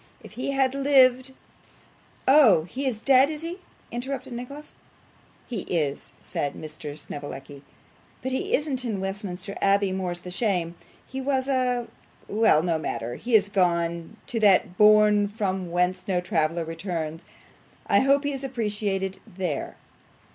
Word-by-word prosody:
If - - -12
he 255 - -4
had 270 -1 +2
lived 265 -2 +4 0.5
' - - -32
'Oh, 255 - +6
he 265 - -4
is 235 -5 -2
dead, 265 +3 +5
is 310 0 -4
he?' 345 +3 -5 0.3
interrupted 255 +1 -4
Nicholas. 275 +5 -8 0.7
'He 230 -6 -4
is,' 150 -6 -2
said 145 -1 -3
Mr. 150 -1 -8
Snevellicci, 145 -1 -8 0.6
'but 260 - -2
he 260 - +1
isn't 275 -4 -2
in 220 -5 -2
Westminster 195 0 -5
Abbey, 200 0 +3
more's 180 -2 -3
the 180 - -7
shame. 180 -5 0 0.3
He 265 +1 -6
was 265 -1 0
a. 250 -3 +1 0.4
Well, 210 -7 +3
no 170 -2 0
matter. 120 -5 -3
He 235 - 0
is 205 -2 +5
gone 170 -1 0
to 230 - -3
that 195 -3 +4
bourne 210 0 +5
from 190 -3 -3
whence 180 +1 0
no 185 -2 +1
traveller 165 -1 0
returns. 165 -1 -4 0.6
I - - +4
hope 275 +2 +3
he 285 0 -1
is 270 0 -5
appreciated 205 -6 -2
THERE. 175 -6 -4
205 Hz, 145 wpm, -25 LUFS, 175-255 Hz, 0.7 s, Oh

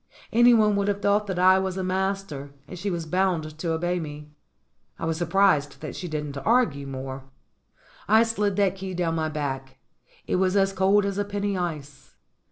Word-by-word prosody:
Anyone 225 -3 +5
would 200 0 0
have 200 -1 0
thought 205 +1 +1
that 190 -2 -3
I 185 +1 +5
was 190 0 -2
a 190 - -2
master, 190 -6 -2 0.2
and 180 - -9
she 200 +3 -2
was 170 -3 -3
bound 160 -3 -1
to 165 0 -2
obey 175 +2 -1
me. 150 -1 -8 0.7
I - - -4
was 165 0 0
surprised 170 -3 +2
that 155 - -6
she 180 - -5
didn't 150 -3 -4
argue 160 - +1
more. 135 0 -6 0.8
I 220 +2 +6
slid 210 -3 0
that 195 -1 +1
key 190 -1 -5
down 170 -2 0
my 160 -1 -1
back. 135 -3 -4 0.5
It - - 0
was 185 +1 +2
as 195 0 +2
cold 195 +2 +3
as 200 0 -2
a - - +2
penny 200 0 -2
ice. 155 -6 -5
185 Hz, 185 wpm, -25 LUFS, 155-200 Hz, 0.8 s, I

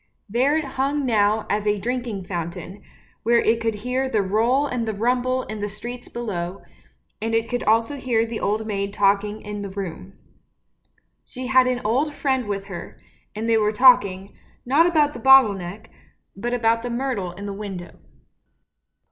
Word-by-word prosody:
There 255 +8 +2
it 315 - -1
hung 275 +2 -1
now 215 -2 +2
as 210 +1 -1
a 210 0 +2
drinking 235 -2 -3
fountain, 175 +2 -6 0.4
where 235 +1 +3
it 230 0 +2
could 225 -1 0
hear 250 +5 -2
the 215 -5 +1
roll 230 +8 +2
and 245 -5 -2
the 220 - -2
rumble 250 +3 0
in 215 0 -7
the 205 0 -3
streets 240 +4 -8
below, 195 -5 -4 0.6
and 225 +1 -1
it 225 0 +1
could 245 0 -2
also 230 +6 +2
hear 240 -4 +1
the 225 -1 -5
old 215 +2 -1
maid 200 -2 -3
talking 205 +1 +1
in 210 -1 -5
the 200 - -5
room. 190 -1 -6 1.1
She 255 0 -7
had 255 0 +4
an 250 -1 0
old 280 +7 +1
friend 265 -5 0
with 200 -1 -3
her, 190 -3 -9 0.4
and 220 +2 -3
they 225 -1 +4
were 210 -1 +2
talking, 210 -5 +4 0.3
not 290 +7 +4
about 300 -4 +2
the 240 - -8
bottle 265 -3 +7
neck, 195 +3 -8 0.4
but 240 +5 -2
about 230 -1 +2
the 245 - -4
myrtle 235 -8 -2
in 200 +3 -8
the 200 - -4
window. 195 -4 -7
225 Hz, 175 wpm, -23 LUFS, 200-250 Hz, 1.1 s, bottle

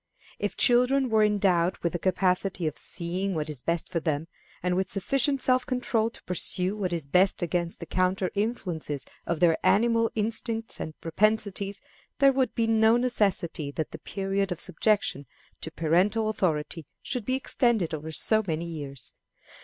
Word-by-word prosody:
If - - -3
children 250 +2 +4
were 220 -1 +4
endowed 190 -4 +2
with 170 - 0
the 175 - -2
capacity 185 0 0
of 155 - -1
seeing 185 +2 -3
what 155 -1 -2
is 140 -4 -5
best 170 +2 -1
for 170 - 0
them, 155 -1 -2 0.4
and 180 0 +1
with 190 +1 -1
sufficient 275 +7 +1
self 255 0 +3
control 245 -3 0
to - - -13
pursue 180 +2 0
what 195 -4 -2
is 165 -4 -2
best 180 +4 +3
against 170 0 -2
the 170 - -6
counter 185 +2 0
influences 180 - -3 0.2
of 170 -2 -1
their 165 -2 +4
animal 230 +1 +3
instincts 225 +1 -2
and 155 - -6
propensities, 200 +2 0 0.4
there 275 -1 +5
would 260 -1 0
be 230 - +1
no 225 +1 +4
necessity 200 - 0
that 155 0 -3
the - - -8
period 195 0 -2
of 175 - -3
subjection 185 -6 0 0.3
to - - -4
parental 180 +8 +1
authority 165 -6 -2 0.2
should 250 -4 -2
be 255 +4 0
extended 235 - +1
over 155 +1 -5
so 220 +7 +3
many 165 0 -2
years. 145 -6 -6
190 Hz, 165 wpm, -27 LUFS, 170-220 Hz, 0.4 s, there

